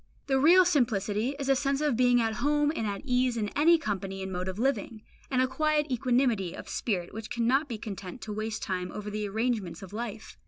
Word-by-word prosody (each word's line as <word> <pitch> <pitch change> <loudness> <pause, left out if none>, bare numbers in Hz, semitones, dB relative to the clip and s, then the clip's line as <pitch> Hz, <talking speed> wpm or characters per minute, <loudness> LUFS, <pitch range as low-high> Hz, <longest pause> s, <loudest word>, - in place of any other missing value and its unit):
The 270 -1 +2
real 355 +6 +7
simplicity 230 - +1
is 280 -2 -4
a 270 - +4
sense 275 0 0
of 295 -4 +1
being 245 0 +4
at 225 -1 0
home 295 +1 +2
and 225 - -1
at 200 -1 -4
ease 250 -2 +1
in 210 -2 -1
any 330 +7 +4
company 195 - -4
and 190 - -5
mode 180 0 -3
of 190 0 -4
living, 230 -3 -1 0.3
and 255 -1 +2
a - - +1
quiet 300 +2 0
equanimity 240 -7 +1
of - - -9
spirit 180 -7 -2
which 220 0 -7
cannot 255 +5 +1
be 230 - -3
content 200 -1 -7
to 215 - -5
waste 215 0 -3
time 180 -1 -3
over 210 0 -6
the 210 0 -2
arrangements 210 -6 -2
of 190 - -10
life. 225 -1 -6
230 Hz, 220 wpm, -28 LUFS, 205-270 Hz, 0.3 s, real